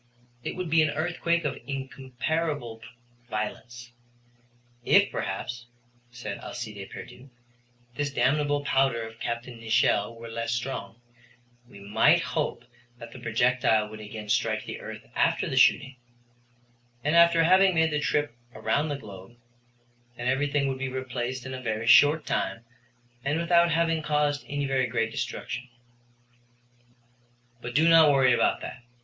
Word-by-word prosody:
It - - -4
would 180 -3 -4
be 160 0 +5
an 155 - +2
earthquake 170 +1 -1
of 140 - -2
incomparable 135 -1 -3 0.5
violence. 120 +3 -5 0.9
If - - +4
besides, 120 -1 -4 0.4
said 120 -4 -7
Alcide 105 -5 -7
Pierdeux, 130 +3 -11 0.6
this 145 +2 -2
damnable 145 +3 +1
powder 135 -4 +2
of 115 0 -10
Capt. 120 +1 -3
Nicholl 115 -2 0
were 115 0 -10
less 115 0 -3
strong, 120 -3 -4 0.7
we 100 - -13
might 100 +1 +3
hope 125 - -3 0.3
that 115 -1 -10
the 130 - -11
projectile 120 -2 +2
would 110 0 -10
again 105 0 -8
strike - - 0
the - - -6
earth - - -8
after - - +1
the - - -3
shooting, 135 -1 +3 1.1
and 150 +3 +1
after 170 -1 +6
having 185 +2 +5
made 160 -1 +3
the 150 - 0
trip 145 -2 0 0.2
around 150 +2 0
the 145 - -2
globe, 100 -2 -12 0.8
then 120 - -4
everything 140 +2 +1
would 135 -1 -3
be 135 0 -2
replaced 130 -1 -4
in 130 - -6
a 130 - -6
very 110 -2 -3
short 145 +7 +6
time 95 +5 -2 0.6
and 145 +3 0
without 170 0 +4
having 165 -1 +1
caused 150 -3 0
any 145 0 -2
very 135 -2 +1
great 115 -1 -1
destruction. 125 +2 -5 1.9
But 120 0 -7
do 160 +3 +4
not 165 -2 +7
worry 130 -3 +4
about - - +1
that. 125 - -8
130 Hz, 145 wpm, -27 LUFS, 115-150 Hz, 1.9 s, not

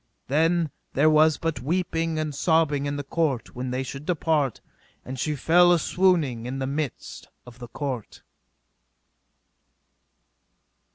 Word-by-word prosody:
Then 165 +2 +2 0.2
there 155 +3 +4
was 155 0 +4
but 165 -1 -2
weeping 165 +1 -1
and 155 -1 -2
sobbing 145 -1 +1
in 140 - -2
the 145 - -4
court 145 -4 -1
when 125 +1 -4
they 130 +1 -2
should 135 +2 -7
depart, 155 - 0 0.5
and 130 0 -6
she 150 +3 -1
fell 175 +5 +5
a 175 - +5
swooning 160 -10 +1
in 130 +2 -4 0.2
midst 150 -4 -5 0.2
of 125 0 -14
the 120 - -8
court. 130 -3 -6
150 Hz, 130 wpm, -25 LUFS, 130-165 Hz, 0.5 s, fell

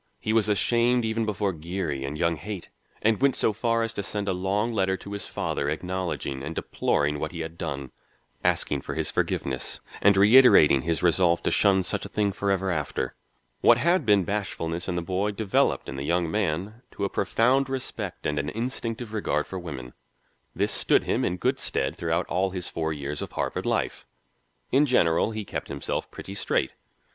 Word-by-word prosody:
He 110 - -1
was 110 -2 +3
ashamed 120 +3 +3
even 110 0 -1
before 100 -2 0
Geary 80 -4 -3
and 70 +3 -4
young 85 0 +1
Haight, 95 +3 -7 0.3
and 110 +1 +2
went 140 -1 +4
so 110 - +2
far 115 +2 +1
as 115 0 -3
to 100 - -3
send 100 +1 -3
a 95 - +1
long 100 +5 0
letter 95 -2 +1
to 100 - -10
his 100 -1 -4
father 70 - -2
acknowledging 90 -4 -3
and 75 +4 -5
deploring 75 0 0
what 75 - -3
he 85 - -5
had 80 0 -6
done, 70 -6 -5 0.5
asking - - +1
for - - -5
his - - -1
forgiveness 65 -2 -1 0.2
and 100 0 +5
reiterating 100 - +7
his 80 +4 -1
resolve 85 0 +3
to - - +1
shun 95 -2 +4
such 95 +2 -2
a - - -6
thing 105 -1 0
forever 95 -1 0
after. 75 -5 -2 0.5
What 120 - +6
had 170 +6 +2
been 105 -4 +4
bashfulness 90 -3 -3
in 90 - -1
the 85 - -2
boy 95 +4 -1
developed 100 -1 +1
in 65 - -5
the 70 - -3
young 85 +2 0
man 105 +3 -1
to 100 - -2
a - - +2
profound 125 +8 +2
respect 130 -1 -4
and - - 0
an 70 - -2
instinctive 115 - -4
regard 90 -8 0
for 95 - -6
women. 65 -8 -7 0.6
This - - +1
stood - - +3
him - - 0
in 90 - 0
good - - 0
stead - - -1
throughout 85 +1 -1
all 95 +2 0
his 90 -1 -4
four 80 -1 -2
years 75 -1 -4
of - - -6
Harvard - - -2
life. - - -1 0.6
In 145 +3 +4
general, 85 -8 +3
he 110 -2 -5
kept - - -5
himself 70 - -3
pretty 95 - -8
straight. 100 - 0
95 Hz, 190 wpm, -26 LUFS, 80-110 Hz, 0.6 s, reiterating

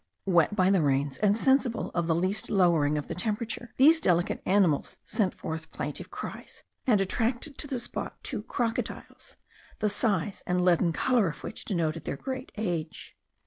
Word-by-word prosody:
Wet 180 +1 +3
by 185 -1 +4
the 190 -3 +4
rains 140 -1 +1
and 210 0 +3
sensible 265 -2 +2
of 170 -2 0
the 165 - +2
least 185 +5 -1
lowering 170 -7 +3
of 145 - -4
the - - -4
temperature, 225 +4 -3
these 315 +5 +7
delicate 175 - +1
animals 185 -7 +2
sent 200 -5 0
forth 160 0 -6
plaintive - - -5
cries, - - -8 0.2
and 215 -5 +5
attracted 240 +8 -1
to 290 - -2
the 265 -3 -2
spot 235 - -5
two - - -2
crocodiles, 230 -3 -4 0.4
the 210 - +1
size 200 -2 0
and 180 0 +1
leaden 175 -1 +4
colour 235 +4 +2
of 150 - -6
which - - -7
denoted 165 -5 -1
their - - -3
great 260 - -5
age. 175 -7 -4
195 Hz, 170 wpm, -28 LUFS, 165-225 Hz, 0.4 s, these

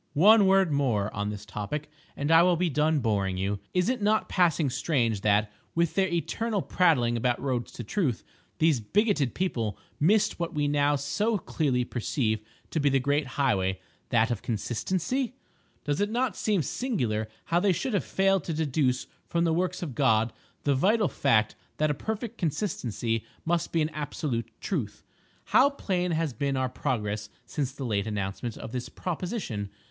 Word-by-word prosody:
One 205 +4 +7
word 190 -3 +4
more 120 -8 +1
on 105 0 -2
this 105 0 -6
topic 105 +9 -4 0.3
and 145 +3 0
I 165 0 +8
will 180 0 +4
be 175 -1 0
done 150 +1 +2
boring 100 -5 0
you. 100 +2 -1
Is 180 +1 +1
it 250 -2 0
not 215 +1 +2
passing 165 -6 +2
strange 115 -9 0
that, 105 +1 +2 0.2
with 170 -1 +2
their 195 -1 +2
eternal 200 +4 -1
prattling 135 -10 +3
about 120 +1 +1
roads 125 -4 -2
to 120 - -6
Truth, 135 - -1 0.3
these 155 -5 +3
bigoted 155 - +1
people 115 - -1 0.2
missed 200 +6 +3
what 170 -2 -3
we 145 -1 +1
now 145 0 +3
so 205 +11 0
clearly 140 -8 0
perceive 115 -2 -1 0.3
to 160 - 0
be 145 -1 +3
the 135 0 +3
great 145 +2 +1
highway—that 110 -1 0
of 115 - -2
Consistency? 185 - -2 0.5
Does 145 +4 -1
it 205 - +1
not 240 -2 0
seem 205 -7 +1
singular 125 - -1 0.2
how 170 - +2
they 200 +1 +3
should 235 +7 -1
have 200 - +1
failed 195 -2 +2
to 165 - -2
deduce 140 -4 +1 0.2
from 170 -1 +1
the 165 -1 +2
works 180 +1 -1
of 150 -7 -4
God 110 0 +2 0.3
the 145 - +3
vital 200 - +3
fact 110 -6 +2 0.2
that 155 0 +2
a - - +1
perfect 220 - -4
consistency 120 - -1 0.2
must 170 0 0
be 165 -2 +2
an 155 - -1
absolute 145 -6 -3
truth! 135 - -3 0.4
How 275 - +5
plain 185 -10 -1
has 160 -4 0
been 140 0 -1
our 130 0 0
progress 105 -4 -2 0.2
since 140 -4 -2
the 135 0 -6
late 105 -3 0
announcement 105 +2 -3
of - - -7
this 125 0 -4
proposition! 175 - -4
145 Hz, 175 wpm, -28 LUFS, 115-180 Hz, 0.5 s, I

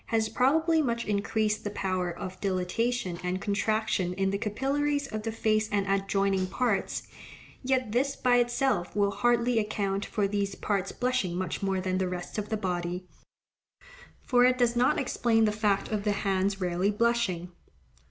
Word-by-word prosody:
has 220 -1 +1
probably 320 +7 +3
much 235 -4 -1
increased 210 +1 0
the 205 - -2
power 185 -3 -1
of 185 +2 -7
dilatation 190 +1 -1
and 180 +1 -1
contraction 205 -2 0
in 195 0 0
the 200 - 0
capillaries 280 +7 0
of 215 -5 -5
the 225 +1 -3
face 215 -1 +1
and 200 -1 +1
adjoining 195 -1 +1
parts, 215 +1 -1 0.6
yet 255 -4 0
this 275 +4 +1
by 245 -1 +3
itself 240 -7 +1
will 200 -1 +2
hardly 235 +3 +2
account 200 -2 -1
for 205 -1 -1
these 200 -1 -2
parts 195 -2 -1
blushing 250 -9 -1
much 185 -2 -3
more 195 -1 0
than 185 0 -1
the 185 -1 0
rest 180 +3 -5
of 210 0 -5
the 220 - 0
body; 180 -2 -3 1.2
for 245 -2 +4
it 255 0 +4
does 240 -1 +2
not 245 +2 +3
explain 230 -3 +2
the 210 - +2
fact 210 -2 0
of 210 -2 -2
the 210 -1 +1
hands 195 0 0
rarely 180 +1 0
blushing. 210 -5 0
210 Hz, 165 wpm, -28 LUFS, 190-235 Hz, 1.2 s, for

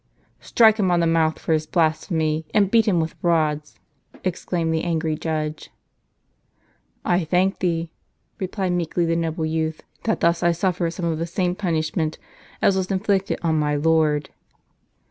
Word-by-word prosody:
t - - -41
" - - -41
Strike 220 -2 +5
him 195 -4 +1
on 175 -1 +3
the 170 - +2
mouth 165 -1 +2
for 160 - -1
his 155 0 0
blasphemy, 160 -1 0
and 200 -2 +3
beat 225 -2 +4
him 185 -5 +3
with 160 0 -2
rods," 155 -3 0 0.4
exclaimed 170 -2 -1
the 160 - 0
angry 160 -2 -1
judge. 155 -1 -3 1.4
"I 175 0 +2
thank 180 +4 +1
thee," 165 -2 -1 0.5
replied 190 0 -2
meekly 175 0 0
the 165 0 +1
noble 165 -1 -1
youth, 160 0 -2 0.2
"that 220 - 0
thus 170 0 +2
I 170 0 +3
suffer 175 0 0
some 170 +1 -5
of 160 -2 -1
the 165 - -2
same 180 +1 0
punishment 160 -4 -1 0.5
as 195 - +4
was 190 -1 -1
inflicted 195 0 0
on 160 -2 +2
my 150 -1 +1
Lord." 150 -1 +2
165 Hz, 165 wpm, -23 LUFS, 160-180 Hz, 1.4 s, Strike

